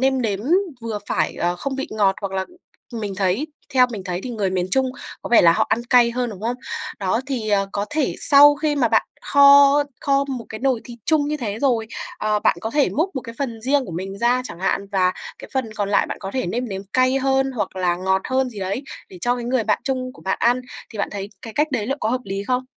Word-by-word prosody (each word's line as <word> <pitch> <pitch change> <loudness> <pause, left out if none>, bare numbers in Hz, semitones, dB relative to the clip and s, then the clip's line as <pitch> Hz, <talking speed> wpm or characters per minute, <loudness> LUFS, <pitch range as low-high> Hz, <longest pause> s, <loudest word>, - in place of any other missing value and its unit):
nêm 265 -1 +2
nếm 205 -3 -1 0.4
vừa 225 -2 -4
phải, 155 -2 0
ờ, 175 +1 0
không 270 +8 -4
vị 270 - -4
ngọt 200 -3 +2
hoặc 200 -2 -4
là 190 0 -2 0.5
mình 210 -4 -4
thấy 195 +9 0 0.3
theo 250 -1 +6
mình 205 - -5
thấy 180 -1 -3
thì 255 - -5
người 205 -5 -1
miền 185 -1 -1
Trung 265 +4 +2 0.3
có - - -5
vẻ 235 - +7
là 170 - +7
họ - - +1
ăn 235 - +1
cay 240 -1 +5
hơn, 245 -1 -2
đúng 195 - -9
không? 240 +2 -1 0.4
Đó 195 +3 0
thì, 240 -6 -2
ờ, 195 -1 +2
có 205 +1 -2
thể 295 -1 0
sau 290 0 +8
khi 295 0 0
mà 280 - +2
bạn - - +2 0.2
kho 280 0 +7 0.3
kho 275 0 +2
một 255 -4 -5
cái 220 - -7
nồi 260 -4 +1
thịt 240 -1 -10
chung 300 -2 +2
như 300 - -1
thế 220 -6 -4
rồi, 235 -4 +1 0.3
ờ, 215 0 +1
bạn - - +2
có 220 - -3
thể 285 +2 +2
múc 345 +6 -1
một - - -1
cái 230 -1 -9
phần 235 -5 -3
riêng 275 +1 +2
của 175 - -7
mình 195 +3 -5
ra 245 +2 +2
chẳng 170 -7 -8
hạn 200 +1 0
và 185 -1 +3 0.3
cái - - -11
phần 240 -5 -1
còn 205 -1 -2
lại 200 - +3
bạn - - -5
có 195 -1 -5
thể 260 - -1
nêm 240 +6 -2
nếm 195 -1 -5
cay 255 +1 +3
hơn 270 0 +1
hoặc 225 -5 -3
là 180 -2 +1
ngọt 190 +1 0
hơn 260 -1 +1
gì 215 - -9
đấy 195 +7 -3 0.3
để 185 - -12
cho 245 +6 +2
cái 240 - -5
người 245 -1 0
bạn 210 - +1
chung 255 -1 -2
của - - -16
bạn 190 - -1
ăn 245 +2 +3 0.3
thì 215 - -9
bạn - - 0
thấy 200 0 -6
cái 225 - -8
cách 300 +7 +1
đấy 220 -4 -1
liệu 275 - -1
có - - 0
hợp 255 - 0
lý 195 +1 -4
không? 255 0 0
235 Hz, 260 wpm, -21 LUFS, 200-265 Hz, 0.5 s, sau